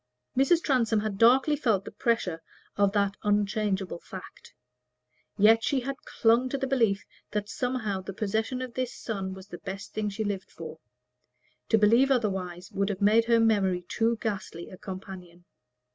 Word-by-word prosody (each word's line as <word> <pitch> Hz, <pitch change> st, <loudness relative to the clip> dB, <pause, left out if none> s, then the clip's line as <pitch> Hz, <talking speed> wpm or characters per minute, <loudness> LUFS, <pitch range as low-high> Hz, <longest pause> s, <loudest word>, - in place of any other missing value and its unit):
Mrs. 275 Hz, +6 st, +3 dB
Transome 230 Hz, -6 st, +2 dB
had 210 Hz, -2 st, -3 dB
darkly 265 Hz, +6 st, +5 dB
felt 220 Hz, -9 st, +1 dB
the -, -, -7 dB
pressure 190 Hz, -8 st, -1 dB, 0.3 s
of 200 Hz, -1 st, +3 dB
that 200 Hz, -1 st, +1 dB
unchangeable 205 Hz, -3 st, 0 dB
fact. 185 Hz, +1 st, -11 dB, 0.9 s
Yet 225 Hz, +2 st, +6 dB
she 275 Hz, -3 st, +1 dB
had 275 Hz, +2 st, -3 dB
clung 235 Hz, +3 st, +2 dB
to 275 Hz, -, -1 dB
the 270 Hz, -, -1 dB
belief 230 Hz, -7 st, +1 dB, 0.2 s
that 210 Hz, -1 st, -2 dB
somehow 220 Hz, -5 st, -2 dB
the 185 Hz, -, -6 dB
possession 220 Hz, +6 st, -2 dB
of 250 Hz, -2 st, -7 dB
this 255 Hz, -1 st, -3 dB
son 195 Hz, -4 st, -4 dB
was 190 Hz, +1 st, -12 dB
the 175 Hz, -, -8 dB
best 195 Hz, +1 st, -7 dB
thing 210 Hz, -1 st, -1 dB
she 205 Hz, +2 st, -3 dB
lived 205 Hz, -2 st, -3 dB
for; -, -, -9 dB, 0.9 s
to 220 Hz, -, +5 dB
believe 230 Hz, +6 st, +5 dB
otherwise 190 Hz, -8 st, -1 dB
would 200 Hz, +1 st, 0 dB
have 195 Hz, -2 st, -3 dB
made 215 Hz, +3 st, +4 dB
her 230 Hz, 0 st, +4 dB
memory 195 Hz, -5 st, +2 dB
too 230 Hz, +4 st, +1 dB
ghastly 190 Hz, -5 st, -4 dB
a 185 Hz, -, -10 dB
companion. 185 Hz, -3 st, -9 dB
210 Hz, 165 wpm, -28 LUFS, 195-235 Hz, 0.9 s, Yet